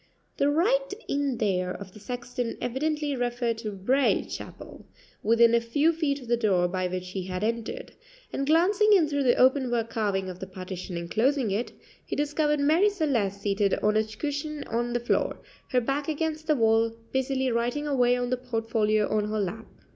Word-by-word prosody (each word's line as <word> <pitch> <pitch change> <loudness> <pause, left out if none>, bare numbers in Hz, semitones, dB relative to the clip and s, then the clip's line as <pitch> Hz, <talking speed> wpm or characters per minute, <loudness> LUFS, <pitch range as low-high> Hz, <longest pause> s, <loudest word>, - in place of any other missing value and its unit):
The 280 - +3
"right 475 +12 +2 0.2
in 280 -3 0
there" 185 -4 0
of 190 0 -8
the 210 - -12
sexton 245 +1 -4
evidently 295 +3 -1
referred 240 -2 -1
to 215 -2 -4
Braye 245 +8 +2
Chapel, - - -9 0.3
within 230 +1 +4
a 235 - +4
few 285 +8 +2
feet 300 -3 -1
of 250 - -12
the 240 - +3
door 190 -6 +2
by 185 0 -1
which 180 0 -5
he 185 -1 -4
had 185 +1 -3
entered; 230 - -3 0.4
and 275 - -2
glancing 390 +7 +4
in 350 -6 +5
through 285 -1 -1
the 250 -3 +4
open 260 0 +4
work 230 -1 -1
carving 200 -4 -1
of 180 -1 -7
the 190 - -6
partition 185 -1 -6
enclosing 225 +8 +1
it, 215 +5 -2 0.3
he - - -4
discovered 295 0 +1
Marie 320 +8 +4
Celeste 255 - 0
seated 200 -1 +1
on 210 0 +3
a 215 - +4
cushion 290 +7 -4
on 240 +1 -2
the 240 - +1
floor, 240 - 0 0.3
her 255 - +3
back 275 +4 -2
against 315 0 -2
the 305 - +4
wall, 225 -1 +2 0.2
busily 265 0 0
writing 240 +5 -1
away 250 -4 +3
on 245 0 -2
the 255 - +1
portfolio 225 -3 0
on 215 -1 0
her 215 0 -1
lap. 205 +3 -3
240 Hz, 185 wpm, -27 LUFS, 215-285 Hz, 0.4 s, in